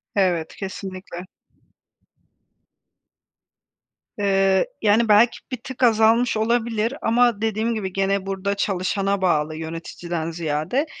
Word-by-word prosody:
Evet, 180 -5 0
kesinlikle. 185 -2 -7 2.9
Eee, 195 - +2
yani, 220 +2 +3
belki 220 +3 +5
bir 255 - -2
tık 260 -1 -5
azalmış 225 0 +4
olabilir 230 +1 0
ama 235 -2 +2
dediğim 220 +1 0
gibi 195 -4 -4
gene 195 0 0
burada 195 +1 -2
çalışana 195 0 -1
bağlı 155 -4 +1
yöneticiden 165 +1 -5
ziyade. 165 - -1
200 Hz, 100 wpm, -22 LUFS, 185-225 Hz, 2.9 s, belki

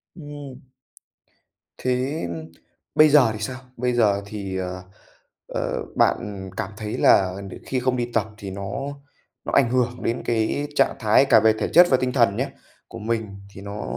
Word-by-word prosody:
Ừm. 145 -5 -9 1.2
Thế 130 - -1 0.7
bây 155 0 +7
giờ 140 -6 +6
thì 105 - -7
sao? 130 +4 -4 0.2
Bây 125 0 0
giờ 105 -4 +3
thì, 100 -2 -5
ờ, 90 0 -4 0.6
ờ, - - -3
bạn 95 -2 0
cảm 95 - -3
thấy 105 0 -4
là 95 -2 +4
đ - - -9
khi 130 - -1
không 125 0 0
đi 120 0 -2
tập 110 -2 +1
thì 100 -2 -7
nó 100 +1 -5 0.7
nó - - -3
ảnh 125 -4 +4
hưởng 125 0 0
đến 115 +2 -1
cái 120 +5 0
trạng 135 - +3
thái 110 +4 +4
cả 135 - +6
về 110 0 +4
thể - - 0
chất 175 +1 +8
và 130 - +5
tinh 125 0 -1
thần 115 -6 +3
nhá, - - -1 0.4
của - - -9
mình 110 0 -2 0.3
thì 95 - -10
nó 100 +1 -6
115 Hz, 175 wpm, -23 LUFS, 100-130 Hz, 1.2 s, chất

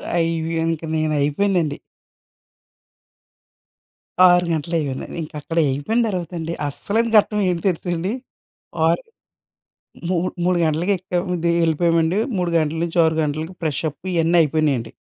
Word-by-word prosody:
అయ్ 165 -1 +2
వి 165 - -3
ఇంక 165 -1 -1
నేను 155 0 0
అయిపోయిందండి. 160 0 +1 2.5
6 175 -1 +5
గంటలు 165 +2 -2
అయిపోయింది. 140 -4 -3
ఇంక 155 - -7
అక్కడ 165 +3 -6
అయిపోయిన 180 - 0
తర్వాత 180 -3 -4
అండి. 165 +1 -4
అస్సలైన 225 +10 -1
ఘట్టం 210 0 +3
ఏమి 170 -2 -1
తెలుసండి! 175 +1 -1 0.8
ఆరు 170 - +1 1.1
మూ 185 - +1 0.3
మూడు 180 0 +2
గంటలకి 160 +5 0
ఎక్కాం 180 0 -3 0.2
దిగి 170 0 +2
వెళ్ళిపోయామండి. 165 +2 +2 0.2
3 180 -1 -1
గంటల 155 0 0
నుంచి 170 +1 -3
6 160 0 +1
గంటలకి 155 +4 -3
ఫ్రెష్ 150 -4 -1
అప్ 145 - -18
ఇవన్నీ 170 +1 +2
అయిపోయినాయండి. 145 -6 0
165 Hz, 130 wpm, -21 LUFS, 155-175 Hz, 2.5 s, 6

